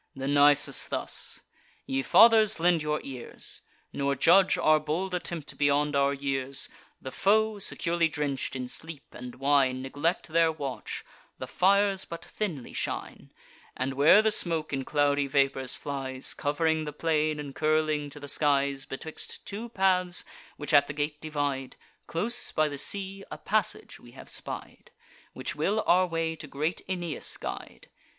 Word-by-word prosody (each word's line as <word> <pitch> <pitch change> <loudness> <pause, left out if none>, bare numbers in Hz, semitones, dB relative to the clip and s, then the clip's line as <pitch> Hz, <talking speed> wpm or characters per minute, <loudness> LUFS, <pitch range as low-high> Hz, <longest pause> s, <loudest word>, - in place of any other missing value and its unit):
Then 135 +1 -2
Nisus 145 0 +4
thus: - - -3 0.4
"Ye 135 0 -1
fathers, 220 - +6
lend 170 -1 +3
your 150 0 -1
ears; 130 -3 -6 0.3
Nor 140 0 0
judge 185 +7 +5
our 155 0 +4
bold 165 +5 -2
attempt 170 -4 -4
beyond 145 0 +2
our 140 0 +3
years. 135 -1 -3 0.3
The 130 - -7
foe, 215 +4 +2
securely 170 -3 0
drench'd 145 -4 -2
in 130 -1 -4
sleep 160 +2 -6
and 125 0 -9
wine, 135 -2 +2
Neglect 145 +7 -1
their 165 0 +3
watch; 135 -7 -5 0.3
the - - -5
fires 195 +1 +2
but 170 - -8
thinly 170 - -5
shine; - - -5 0.5
And 130 +1 -1
where 150 +10 +6
the 220 - +3
smoke 165 -6 0
in 135 -1 -2
cloudy 145 -1 +2
vapours 135 -1 +1
flies, 135 -2 -4
Cov'ring 155 +2 0
the 150 - -5
plain, 155 -1 0
and 145 -2 -6
curling 155 -1 +1
to 145 - -11
the 145 - -8
skies, 140 -1 +1
Betwixt 155 +4 -7
two 220 +4 -6
paths, 185 -4 +2 0.3
which 145 +1 -3
at 145 -1 +6
the - - -5
gate 150 +1 -3
divide, 145 -4 -2 0.3
Close 235 +8 -1
by 155 0 +2
the 145 -2 -4
sea, 195 +3 -1
a - - -6
passage - - -1
we - - -16
have - - -11
spied, - - -7 0.4
Which - - -4
will 215 +2 0
our 185 +1 +4
way 165 -1 -2
to 155 - -7
great 150 +5 -2
Aeneas 175 -4 -3
guide. - - -7
150 Hz, 155 wpm, -28 LUFS, 140-175 Hz, 0.5 s, fathers